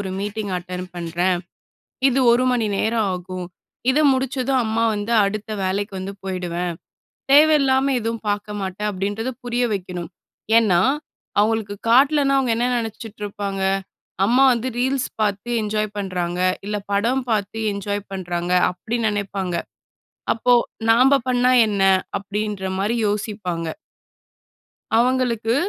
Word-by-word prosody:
ஒரு 190 -2 -4
meeting 205 -1 -3
attend 180 0 -6
பண்றேன். 175 +1 0 0.7
இது 265 - +1
1 250 +2 +3
மணி 230 -3 +1
நேரம் 220 0 +1
ஆகும். 180 0 -6 0.4
இத 285 - +2
முடிச்சதும், 260 0 0
அம்மா 220 +1 0
வந்து 205 +3 -3
அடுத்த 210 +2 -4
வேலைக்கு 200 +2 -2
வந்து 190 +1 -5
போயிடுவேன். 180 -2 -3 0.6
தேவையில்லாம 275 -3 +5
எதுவும் 230 0 -3
பார்க்க 205 0 -3
மாட்டேன்." 195 +2 -3
அப்படீன்றத 205 +6 -3
புரிய 245 0 0
வைக்கணும். 180 -2 -5 0.5
ஏன்னா, 185 -6 +3 0.6
அவங்களுக்கு 215 -1 0
காட்டலன்னா, 275 +3 +4
அவங்க 250 -4 +1
என்ன 245 +1 +1
நெனைச்சிட்டு 225 -2 -6
இருப்பாங்க? 200 -1 -4 0.7
"அம்மா 250 +4 +4
வந்து 240 +1 -1
ரீல்ஸ் 260 +1 0
பார்த்து 205 +2 -1
என்ஜாய் 215 0 -2
பண்றாங்க. 180 -2 -2 0.3
இல்ல, 210 0 -2 0.2
படம் 235 +6 +1
பார்த்து 205 0 -1 0.2
என்ஜாய் 205 0 -3
பண்றாங்க." 175 -1 -3 0.2
அப்படி 220 +7 -4
நெனைப்பாங்க. 200 -3 -3 0.8
"அப்போ, 245 +2 +4 0.4
நாம்ப 260 +4 +5
பண்ணா 250 0 +3
என்ன?" 200 -2 0 0.4
அப்படீன்ற 200 -1 -3
மாரி 215 +5 0
யோசிப்பாங்க. 200 -5 -3 1.3
அவங்களுக்கு 240 -2 +1
210 Hz, 120 wpm, -21 LUFS, 190-240 Hz, 1.3 s, தேவையில்லாம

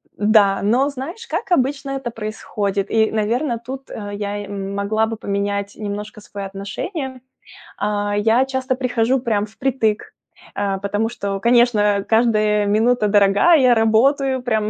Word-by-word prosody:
м-да, 205 -2 +3
но 250 +8 +2
знаешь, 305 - -7
как 360 +4 -4
обычно 275 +1 -2
это 245 -3 -5
происходит. 205 -2 -3
И, 220 -1 +2
наверное, 230 +4 0
тут, 260 +3 -9
э, 205 -1 -6
я, 205 0 -4
м, 195 0 -5
могла 215 +2 0
бы 225 -1 -5
поменять 200 0 -3
немножко 210 0 -6
свое 200 -1 -7
отношение. 260 - -5 0.6
А, 205 0 -1
я 225 +5 +3
часто 260 -1 -2
прихожу 250 0 +1
прям 215 -4 0
впритык, 220 -1 0 0.6
э, 195 -1 -1
потому 205 +3 -1
что, 200 -4 -4
конечно, 240 -1 +4
э, 205 -1 +2
каждая 215 -2 +2
минута 220 +1 +2
дорога. 205 - +4
Я 255 -4 +5
работаю 260 +4 +2
прям 220 -3 0
220 Hz, 145 wpm, -20 LUFS, 205-250 Hz, 0.6 s, Я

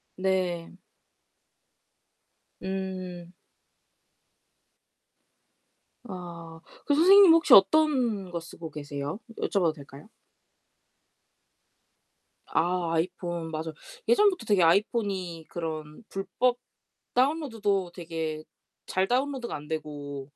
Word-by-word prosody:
네. 185 -3 -1 1.9
음. 185 -2 -5 2.7
아. 170 -4 -9 0.3
그 290 - +2
선생님 375 +3 +8
혹시 330 0 +5
어떤 235 - +4
거 170 - -3
쓰고 165 -1 -10
계세요? 145 +3 -5 0.2
여쭤봐도 175 -6 +1
될까요? 140 0 -13 2.4
아, 175 0 0
아이폰. 175 0 -2
맞어. 160 0 -4 0.3
예전부터 410 - +3
되게 205 -4 +3
아이폰이 185 -2 +1
그런 155 +1 -6
불법 240 +6 0 0.6
다운로드도 225 - 0
되게 160 -3 -5 0.4
잘 190 +1 0
다운로드가 260 -1 -1
안 150 0 -7
되고 145 -3 -5
180 Hz, 175 characters per minute, -27 LUFS, 165-215 Hz, 2.7 s, 선생님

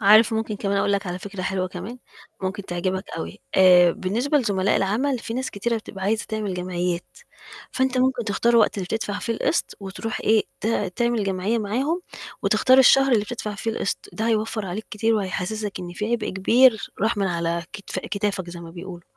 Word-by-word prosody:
عارف، 215 +2 +6
ممكن 220 -1 -2
كمان 200 -1 -1
أقول 200 0 +2
لك 200 0 0
على 180 0 -3
فكرة 195 0 -7
حلوة 185 0 -1
كمان، 195 +7 -7 0.4
ممكن 190 +2 -3
تعجبك 185 +2 -2
أوي، 85 +1 -6
آآ، 180 -2 +7
بالنسبة 235 - 0
لزملاء 200 -5 +1
العمل، 245 +8 +1
في 225 0 -6
ناس 260 +1 -2
كتيرة 230 +4 -1
بتبقى 195 -3 -7
عايزة 215 +2 +1
تعمل 215 -3 -2
جمعيات، 180 -1 -2 0.7
فأنت 260 -1 0
ممكن 255 -1 +2
تختار 230 +3 +1
الوقت 220 -2 +4
اللي 185 - -2
بتدفع 205 0 -3
فيه 230 +2 -2
القِسْط 275 - -1
وترُوح 205 +3 -5
إيه 220 0 +4 0.2
ت 220 - -1 0.3
تعمل 240 -3 +1
جمعية 195 +3 0
معاهم 265 - -1 0.4
وتختار 260 0 +4
الشهر 270 +1 +6
اللي 220 -4 +4
بتدفع 210 -2 -5
فيه 225 +3 -2
القِسْط، 210 - -3
ده 225 +1 -1
هيوفّر 220 -1 0
عليك 195 +4 -5
كتير 225 +2 +1
وهيحسِّسَك 205 +1 -3
إن 175 -1 -7
في 210 +5 -3
عبء 235 -3 0
كبير 220 +2 +4
راح 220 +1 +1
من 195 -1 +1
على 170 -1 -1
كتف 200 - -5
كتافك 200 -3 -2
زي 175 0 -8
ما 165 -1 -9
بيقولوا، 175 0 -9
205 Hz, 190 wpm, -23 LUFS, 185-230 Hz, 0.7 s, آآ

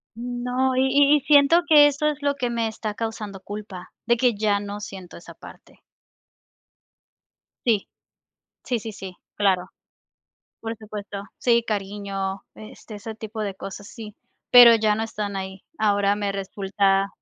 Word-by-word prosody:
No, 245 +2 -2
y 260 - +3
y 285 +2 +5
y - - 0
siento, 290 +4 +5
que 300 -3 +7
eso 290 +1 0
es 300 -1 -1
lo 285 0 +1
que 250 -3 -2
me 230 -1 -1
está 215 -1 -5
causando 215 -4 -5
culpa, 205 -3 -9
de 235 - +3
que 245 -3 +3
ya, 205 -1 +1
no 205 0 -6
siento 190 -3 -9
esa 170 0 -12
parte. - - -15 1.9
Sí. 215 -4 +1 0.8
Sí, 245 -3 -1
sí, 220 +1 -7
sí, 190 -3 -9 0.2
claro. 190 -2 +1 0.9
Por 225 0 -5
supuesto. 205 -2 -8
Sí, 235 -2 +2
cariño, 195 -2 -4
este, 215 0 -11
ese 215 +2 -8
tipo 220 0 -7
de 200 -2 -3
cosas, 200 +1 -9
sí, 215 -2 -10 0.4
pero 240 -2 +10
ya 215 -1 +2
no 220 - -2
están 210 -2 -5
ahí. 190 0 -6
Ahora 205 -1 +2
me 205 -1 -2
resulta 195 0 0
215 Hz, 155 wpm, -23 LUFS, 200-240 Hz, 1.9 s, pero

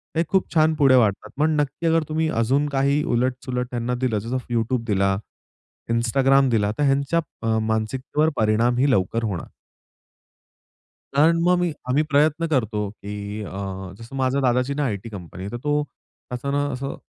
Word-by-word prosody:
ते 165 - +3
खूप 190 -2 0
छान 160 0 +4
पुढे 135 -4 +5
वाढतात. 105 -5 +2
पण 155 0 +3
नक्की 145 +4 -4
अगर 165 -1 +3
तुम्ही 160 +1 0
अजून 140 +6 +2
काही 140 +2 +1
उलट-सुलट 125 0 -1
त्यांना 120 +1 -2
दिलं. 115 -5 +1
जसं 120 +5 -3 0.2
YouTube 115 +1 0
दिला, 95 -1 +2 0.7
Instagram 135 +3 +3
दिला, 105 -2 +2
तर 145 - +1
ह्यांच्या 140 +4 +2 0.3
अ, 110 0 +2
मानसिकतेवर 125 +8 0
परिणामही 120 +5 +2
लवकर 115 +2 +1
होणार. 95 -6 -3 1.7
कारण 160 +4 +4
मग 180 +1 +4
मी 175 -2 +1 0.2
आम्ही 140 +4 +3
प्रयत्न 155 +3 +2
करतो, 110 -8 0
की 105 0 -7
अ, - - -7 0.5
जसं 115 +4 -10
माझ्या 135 +1 +1
दादाचीना 130 +3 +1
आय-टी 110 -1 -3
कंपनी 95 -2 -9
आहे. 100 - -6
तर 120 - -4
तो 150 0 +1
त्याचा 135 -1 -8
ना 145 0 +1
असं 135 +2 -4
130 Hz, 160 wpm, -23 LUFS, 110-145 Hz, 1.7 s, पुढे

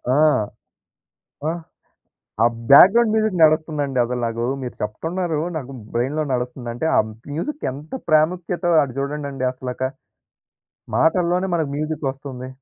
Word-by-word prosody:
ఆ! - - +3 1.3
ఆహ్, 170 0 -3 0.8
ఆ - - +6 0.2
బ్యాక్గ్రౌండ్ 215 +10 +8
మ్యూజిక్ 215 -4 +1
నడుస్తుందండి 150 -4 +2
అసలు 125 +1 -3
నాకు. 115 +1 -3 0.2
మీరు 125 - -6
చెప్తున్నారు, 160 - -2 0.2
నాకు 135 -2 -7 0.2
బ్రెయిన్‌లో 135 +6 0
నడుస్తుందంటే 125 +2 -3
ఆ - - +6 0.3
మ్యూజిక్ 295 - -4
ఎంత 145 - -10 0.2
ప్రాముఖ్యతో 175 +3 +2
అటు 130 -2 -6
చూడండండి 140 -2 -3
అసలక. 130 0 -7 1.2
మాటల్లోనే 180 +3 +2
మనకు 155 -4 0
మ్యూజిక్ 155 -1 -3
ఒస్తుంది. 130 -2 -8
150 Hz, 115 wpm, -21 LUFS, 130-170 Hz, 1.3 s, బ్యాక్గ్రౌండ్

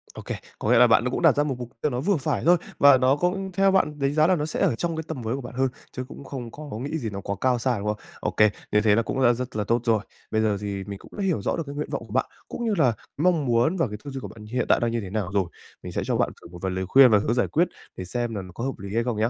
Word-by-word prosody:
Ô - - -7
kê, - - -4 0.2
có - - -1
nghĩa - - +6
là 125 +1 +7
bạn 120 +2 +4
cũng - - -2
đặt 165 -5 +5
ra 145 - +3
một 140 -3 -2
mục 120 -1 -6
tiêu 150 - +1
nó 125 - -2
vừa 190 +7 +2
phải 135 - -1
thôi 175 +1 +6 0.2
và 140 -1 +8
nó 130 +2 +3
cũng 190 +5 -1
theo 195 +2 +3
bạn 150 -6 +1
đánh 140 0 +1
giá 155 +1 +4
là 185 - +4
nó 150 -3 -1
sẽ 155 - -4
ở 175 -11 +3
trong 165 +6 -2
cái 160 - -3
tầm 150 -6 -5
với 115 +2 -2
của 135 - -5
bạn 125 - -9
hơn, 135 +1 +2 0.2
chứ 130 - -5
cũng 140 - -10
không 130 -4 -7
có 150 +3 -9
nghĩ 145 +3 -2
gì 120 -8 -3
nó 100 -1 -6
quá 100 +1 -3
cao 125 -2 +2
xa, 125 0 0
đúng 100 - -4
không? 105 0 0 0.2
Ô - - -1
kê, 105 0 +5 0.2
như 105 - +4
thế 105 -1 +4
là 115 - +3
cũng 130 +3 -2
đã 120 -1 +6
rất 125 +1 -5
là 105 - 0
tốt 115 +3 +1
rồi. 115 -2 +3 0.3
Bây 110 - +2
giờ 105 -2 +1
thì 100 -1 -3
mình 100 0 -7
cũng - - -16
hiểu 185 - 0
rõ - - 0
được 165 - -2
cái 140 0 -7
nguyện 150 - -3
vọng 140 -5 -3
của 105 - -10
bạn, 130 - +2 0.2
cũng 240 - -5
như 220 - +1
là 130 -7 +4 0.2
mong 165 -1 +2
muốn 120 +9 +2
và 165 - +2
cái 105 -1 -6
tư 145 - -7
duy 135 - -5
của - - -6
bạn 110 -1 -12
hiện 120 +3 -1
tại - - +5
đang 120 -1 0
như 115 0 -1
thế 100 - -7
nào 100 -2 -2
rồi. 100 -2 +2 0.4
Mình - - -6
sẽ - - -2
cho - - 0
bạn - - +2
thử - - -12
một 85 +1 -11
vài 95 - -1
lời 95 0 -2
khuyên 130 +4 +7
và 105 - +6
hướng 110 +2 0
giải 125 - +1
quyết 170 +3 +2 0.3
để 95 - -5
xem 120 +3 -3
là 100 - -3
nó 90 -1 -10
có 115 - -5
hợp 135 +1 -3
lý 100 +1 -7
hay 115 - +2
không 120 -2 -2
nhá. 110 +2 +2
125 Hz, 345 wpm, -25 LUFS, 110-150 Hz, 0.4 s, và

